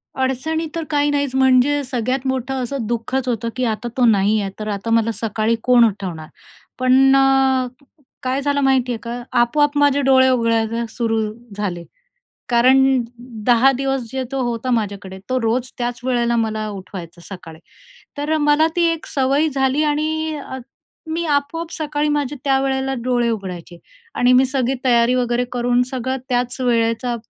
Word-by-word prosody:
अडचणी 265 Hz, +5 st, -1 dB
तर 330 Hz, -, -2 dB
काही 290 Hz, -1 st, +1 dB
नाहीच, 285 Hz, -2 st, -1 dB
म्हणजे 265 Hz, +2 st, +3 dB
सगळ्यात 255 Hz, +1 st, -2 dB
मोठं 260 Hz, 0 st, -2 dB
असं 250 Hz, -1 st, -4 dB
दुःखच 240 Hz, +3 st, -2 dB
होतं, 230 Hz, -1 st, -1 dB
की 255 Hz, -, -2 dB
आता 220 Hz, +1 st, -2 dB
तो 250 Hz, -, +4 dB
नाही 210 Hz, -1 st, +3 dB
आहे. 195 Hz, -1 st, -4 dB
तर 215 Hz, -, -5 dB
आता 205 Hz, +2 st, -4 dB
मला 230 Hz, 0 st, +2 dB
सकाळी 220 Hz, +1 st, -1 dB
कोण 245 Hz, -1 st, +5 dB
उठवणार? 185 Hz, -7 st, -4 dB, 0.5 s
पण 260 Hz, +1 st, +5 dB
अ, 270 Hz, -1 st, +3 dB, 0.6 s
काय 260 Hz, +2 st, -1 dB
झालं 285 Hz, 0 st, 0 dB
माहिती 265 Hz, -2 st, +2 dB
आहे 235 Hz, -, -2 dB
का, 240 Hz, +1 st, -5 dB, 0.2 s
आपोआप 290 Hz, +4 st, +1 dB
माझे 285 Hz, -1 st, +3 dB
डोळे 260 Hz, -1 st, +5 dB
उघडायला 230 Hz, -1 st, +1 dB
सुरू 225 Hz, 0 st, -1 dB, 0.4 s
झाले. 180 Hz, -5 st, -3 dB, 0.7 s
कारण 250 Hz, +2 st, +5 dB, 0.7 s
10 245 Hz, +2 st, +5 dB
दिवस 270 Hz, 0 st, -1 dB
जे 265 Hz, +1 st, -3 dB
तो 270 Hz, -, -1 dB
होता 240 Hz, +1 st, -2 dB
माझ्याकडे, 200 Hz, -4 st, -2 dB
तो 255 Hz, 0 st, +1 dB
रोज 240 Hz, +2 st, -1 dB
त्याच 240 Hz, -1 st, -3 dB
वेळेला 240 Hz, -2 st, +1 dB
मला 220 Hz, -1 st, -1 dB
उठवायचा 185 Hz, -4 st, -9 dB
सकाळी. 165 Hz, -5 st, -10 dB, 0.6 s
तर 295 Hz, +2 st, -1 dB
मला 295 Hz, +1 st, +3 dB
ती 345 Hz, -1 st, +3 dB
एक 325 Hz, -, -8 dB
सवय 275 Hz, +3 st, +1 dB
झाली 270 Hz, +2 st, +1 dB
आणि 310 Hz, +1 st, -1 dB
अ, 265 Hz, -2 st, -7 dB, 0.5 s
मी 335 Hz, +1 st, -2 dB
आपोआप 315 Hz, +3 st, -1 dB
सकाळी 300 Hz, -1 st, -2 dB
माझे 290 Hz, -1 st, -2 dB
त्यावेळेला 270 Hz, -1 st, 0 dB
डोळे 245 Hz, -1 st, +1 dB
उघडायचे 180 Hz, -5 st, -6 dB, 0.4 s
आणि 245 Hz, +1 st, +3 dB
मी 255 Hz, +1 st, +5 dB
सगळी 260 Hz, -1 st, -1 dB
तयारी 240 Hz, -1 st, +4 dB
वगैरे 245 Hz, -1 st, 0 dB
करून, 245 Hz, 0 st, +1 dB
सगळं 260 Hz, +1 st, -3 dB
त्याच 245 Hz, +1 st, -1 dB
वेळेचा 235 Hz, 0 st, +1 dB
255 Hz, 160 wpm, -19 LUFS, 230-270 Hz, 0.7 s, कोण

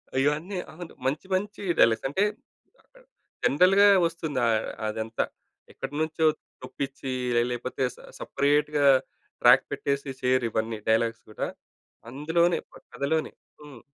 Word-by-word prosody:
అయ్యో! 135 Hz, +2 st, +4 dB
అన్నీ 185 Hz, +5 st, -6 dB, 0.2 s
అవును. 170 Hz, +1 st, -9 dB
మంచి 145 Hz, +8 st, -1 dB
మంచి 205 Hz, +2 st, -3 dB, 0.2 s
డైలా‌గ్స్. 115 Hz, +1 st, +4 dB
అంటే, 190 Hz, +9 st, +1 dB, 0.6 s
అక్కడ -, -, -23 dB, 0.4 s
జనరల్‌గా 190 Hz, +7 st, +5 dB, 0.2 s
వస్తుంది 160 Hz, -5 st, -4 dB
అ -, -, +3 dB, 0.4 s
అదంతా. 110 Hz, +1 st, -2 dB, 0.5 s
ఎక్కడ్నుంచో 155 Hz, +3 st, -2 dB, 0.4 s
చొప్పిచ్చి 135 Hz, +1 st, -5 dB, 0.3 s
ఆహ్, 120 Hz, -, +1 dB
లేపోతే 125 Hz, +2 st, -3 dB
స -, -, -29 dB, 0.2 s
సెపరేట్‌గా 145 Hz, 0 st, +1 dB, 0.6 s
ట్రాక్ -, -, +7 dB
పెట్టేసి 140 Hz, 0 st, -2 dB
చేయరు 125 Hz, -1 st, +2 dB
ఇవన్నీ. 110 Hz, 0 st, -2 dB
డైలాగ్స్ 115 Hz, 0 st, +1 dB
గూడా. -, -, -3 dB, 0.6 s
అందులోనే 165 Hz, +6 st, +1 dB
ప -, -, -18 dB, 0.2 s
కథలోనే. 155 Hz, +3 st, -1 dB, 0.3 s
హ్మ్. 145 Hz, -5 st, -12 dB
140 Hz, 120 wpm, -26 LUFS, 125-160 Hz, 0.6 s, ట్రాక్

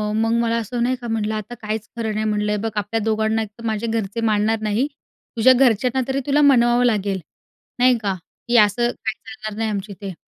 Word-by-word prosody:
मग 225 Hz, +1 st, +1 dB
मला 230 Hz, 0 st, +1 dB
असं," 235 Hz, +1 st, -2 dB
नाही 255 Hz, +2 st, +1 dB
का 240 Hz, -, -6 dB
म्हटलं, 220 Hz, -1 st, -1 dB
"आता 215 Hz, +2 st, -6 dB
काहीच 215 Hz, 0 st, -4 dB
खरं 220 Hz, -2 st, -2 dB
नाही." 215 Hz, +1 st, -1 dB
म्हटलं. 210 Hz, -1 st, 0 dB
"हे 210 Hz, -, +1 dB
बघ, 225 Hz, +2 st, -2 dB
आपल्या 210 Hz, +2 st, -1 dB
दोघांना 220 Hz, 0 st, +1 dB
एक 215 Hz, -, -4 dB
तर -, -, -10 dB
माझे 220 Hz, +1 st, -1 dB
घरचे 225 Hz, -1 st, -2 dB
मानणार 215 Hz, +2 st, +1 dB
नाही. 215 Hz, +6 st, 0 dB, 0.5 s
तुझ्या 255 Hz, +3 st, +7 dB
घरच्यांना 250 Hz, 0 st, +3 dB
तरी 265 Hz, 0 st, 0 dB
तुला 290 Hz, +1 st, +3 dB
मानवावं 245 Hz, -4 st, +5 dB
लागेल, 200 Hz, -4 st, +1 dB, 0.6 s
नाही 250 Hz, 0 st, +5 dB
का, 205 Hz, -4 st, -1 dB, 0.3 s
की 240 Hz, 0 st, +3 dB
असं 220 Hz, +3 st, +4 dB
काही 220 Hz, -1 st, -4 dB
चालणार 215 Hz, -5 st, -8 dB
नाही 225 Hz, 0 st, -1 dB
आमच्या 200 Hz, -1 st, -4 dB
इथे." 195 Hz, -2 st, -5 dB
220 Hz, 210 wpm, -21 LUFS, 210-240 Hz, 0.6 s, तुझ्या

